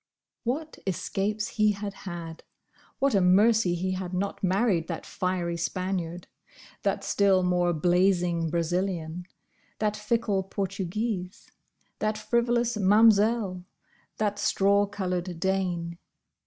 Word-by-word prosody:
What 300 Hz, +6 st, -3 dB
escapes 200 Hz, +3 st, -1 dB
he 215 Hz, -1 st, +2 dB
had 200 Hz, 0 st, -5 dB
had! 170 Hz, -4 st, -8 dB, 0.5 s
What 275 Hz, 0 st, +2 dB
a 200 Hz, -, +4 dB
mercy 195 Hz, +1 st, +4 dB
he 185 Hz, +2 st, -2 dB
had 185 Hz, -1 st, -4 dB
not 200 Hz, +2 st, -3 dB
married 190 Hz, -3 st, +2 dB
that 165 Hz, -3 st, -5 dB
fiery 180 Hz, -2 st, -2 dB
Spaniard; 175 Hz, 0 st, -3 dB, 0.6 s
that -, -, -1 dB
still 195 Hz, -2 st, +3 dB
more 180 Hz, -1 st, +2 dB
blazing 175 Hz, 0 st, +2 dB
Brazilian; 175 Hz, 0 st, -2 dB, 0.5 s
that 210 Hz, -1 st, 0 dB
fickle 210 Hz, -2 st, 0 dB
Portuguese; 195 Hz, +1 st, -4 dB, 0.5 s
that 215 Hz, 0 st, 0 dB
frivolous 235 Hz, +1 st, +1 dB
Mam'selle; 210 Hz, -1 st, +4 dB, 0.5 s
that 205 Hz, -1 st, -1 dB
straw 200 Hz, +1 st, +3 dB
coloured 180 Hz, -3 st, -3 dB
Dane. 175 Hz, -2 st, -1 dB
190 Hz, 110 wpm, -27 LUFS, 175-210 Hz, 0.6 s, a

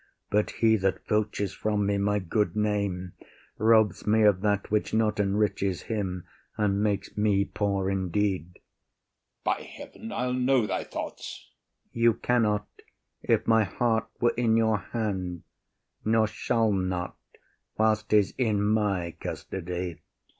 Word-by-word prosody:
But 105 Hz, +1 st, +2 dB
he 110 Hz, -1 st, +3 dB
that 95 Hz, -1 st, -1 dB
filches 105 Hz, -2 st, 0 dB
from 105 Hz, -1 st, 0 dB
me 100 Hz, 0 st, +1 dB
my 105 Hz, +1 st, +1 dB
good 105 Hz, +3 st, 0 dB
name 100 Hz, -4 st, -1 dB, 0.5 s
Robs 110 Hz, -3 st, +3 dB
me 110 Hz, +1 st, +4 dB
of 100 Hz, -3 st, +4 dB
that 105 Hz, -1 st, 0 dB
which 105 Hz, +1 st, 0 dB
not 110 Hz, -1 st, +1 dB
enriches 100 Hz, -2 st, 0 dB
him 95 Hz, -5 st, -3 dB, 0.3 s
And 100 Hz, -1 st, +1 dB
makes 105 Hz, -2 st, -1 dB
me 105 Hz, -2 st, +2 dB
poor 100 Hz, -2 st, -1 dB
indeed. 95 Hz, -2 st, -1 dB
OTHELLO. -, -, -23 dB, 0.8 s
By -, -, 0 dB
heaven, 225 Hz, 0 st, -10 dB
I’ll 125 Hz, -10 st, -1 dB
know 125 Hz, -1 st, +2 dB
thy 105 Hz, -, -2 dB
thoughts. 65 Hz, -, -7 dB, 0.4 s
IAGO. 115 Hz, -, -5 dB
You 115 Hz, -1 st, +6 dB
cannot, 105 Hz, -4 st, +1 dB, 0.5 s
if -, -, +1 dB
my 110 Hz, -1 st, +4 dB
heart 110 Hz, +3 st, 0 dB
were 120 Hz, -1 st, +3 dB
in 115 Hz, -2 st, +2 dB
your 110 Hz, -2 st, +2 dB
hand, 95 Hz, -5 st, -3 dB, 0.6 s
Nor 110 Hz, 0 st, +3 dB
shall 110 Hz, +1 st, 0 dB
not, 95 Hz, -2 st, -2 dB, 0.6 s
whilst 110 Hz, 0 st, +2 dB
’tis 105 Hz, -2 st, +3 dB
in 110 Hz, -5 st, +2 dB
my 105 Hz, -4 st, +1 dB
custody. 90 Hz, -2 st, -5 dB
105 Hz, 140 wpm, -27 LUFS, 95-110 Hz, 0.8 s, You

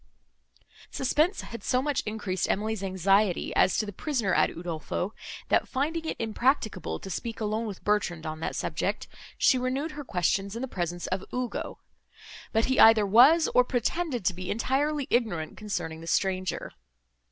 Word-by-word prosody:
Suspense 310 Hz, +8 st, +1 dB
had 230 Hz, -, -9 dB
so 255 Hz, -, +2 dB
much 285 Hz, +1 st, 0 dB
increased 205 Hz, -4 st, -2 dB
her -, -, +2 dB, 0.3 s
anxiety, 195 Hz, +1 st, +1 dB
as 185 Hz, -, +4 dB
to 215 Hz, -, +1 dB
the 205 Hz, -, -7 dB
prisoner 235 Hz, -, -1 dB
at -, -, +4 dB
Udolpho, 170 Hz, +2 st, -4 dB, 0.4 s
that, -, -, +3 dB
finding 315 Hz, +5 st, -2 dB
it -, -, -2 dB
impracticable 230 Hz, +1 st, 0 dB
to 195 Hz, -, -9 dB
speak 225 Hz, +6 st, -4 dB
alone 220 Hz, +1 st, -1 dB
with 200 Hz, -3 st, -7 dB
Bertrand, 185 Hz, -6 st, 0 dB
on 155 Hz, 0 st, -4 dB
that 160 Hz, -, -3 dB
subject, -, -, -2 dB, 0.3 s
she 255 Hz, -, +4 dB
renewed 265 Hz, +5 st, -2 dB
her 295 Hz, -1 st, -7 dB
questions 195 Hz, -, 0 dB
in 235 Hz, -, -4 dB
the -, -, -2 dB
presence 175 Hz, -5 st, -3 dB
of 185 Hz, 0 st, -2 dB
Ugo; 250 Hz, -1 st, -3 dB, 0.7 s
but 225 Hz, 0 st, +2 dB
he 260 Hz, -, +1 dB
either 220 Hz, -2 st, +7 dB
was, 260 Hz, -, +6 dB
or 250 Hz, -, +6 dB
pretended 250 Hz, -, -1 dB
to 185 Hz, -, +3 dB
be 180 Hz, +1 st, -6 dB
entirely 280 Hz, +6 st, 0 dB
ignorant, 200 Hz, -10 st, 0 dB
concerning 165 Hz, -6 st, -4 dB
the 165 Hz, -, -10 dB
stranger. 185 Hz, +1 st, -1 dB
220 Hz, 165 wpm, -27 LUFS, 185-260 Hz, 0.7 s, either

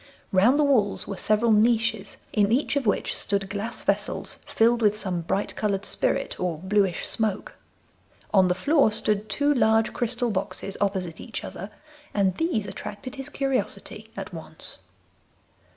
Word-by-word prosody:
Round 215 Hz, +8 st, +5 dB
the 300 Hz, -, +4 dB
walls 240 Hz, -8 st, +2 dB
were 200 Hz, -, -4 dB
several 215 Hz, +4 st, +2 dB
niches, 220 Hz, -1 st, +2 dB, 0.2 s
in 205 Hz, 0 st, +3 dB
each 270 Hz, +5 st, +1 dB
of 275 Hz, -5 st, 0 dB
which 205 Hz, -, +1 dB
stood 200 Hz, -1 st, -1 dB
glass 215 Hz, +4 st, -4 dB
vessels -, -, -1 dB
filled 235 Hz, +1 st, +3 dB
with 210 Hz, -1 st, +3 dB
some 185 Hz, -5 st, -2 dB
bright 190 Hz, +4 st, -2 dB
coloured 200 Hz, -2 st, -1 dB
spirit -, -, 0 dB
or 180 Hz, -3 st, -1 dB
bluish 190 Hz, +1 st, +1 dB
smoke. 215 Hz, -3 st, -1 dB, 0.8 s
On 190 Hz, -2 st, +6 dB
the 180 Hz, -, +1 dB
floor 280 Hz, -, +3 dB
stood 210 Hz, 0 st, 0 dB
two 285 Hz, +8 st, +2 dB
large 225 Hz, -4 st, +3 dB
crystal 240 Hz, 0 st, 0 dB
boxes 195 Hz, 0 st, -3 dB
opposite 190 Hz, -4 st, -1 dB
each 225 Hz, -, -6 dB
other, 195 Hz, +4 st, -7 dB, 0.5 s
and 195 Hz, -3 st, +2 dB
these 325 Hz, -, 0 dB
attracted 210 Hz, +7 st, -7 dB
his 270 Hz, -1 st, -5 dB
curiosity 255 Hz, -5 st, -3 dB
at 195 Hz, -2 st, -6 dB
once. 160 Hz, -1 st, -6 dB
210 Hz, 150 wpm, -25 LUFS, 195-235 Hz, 0.8 s, On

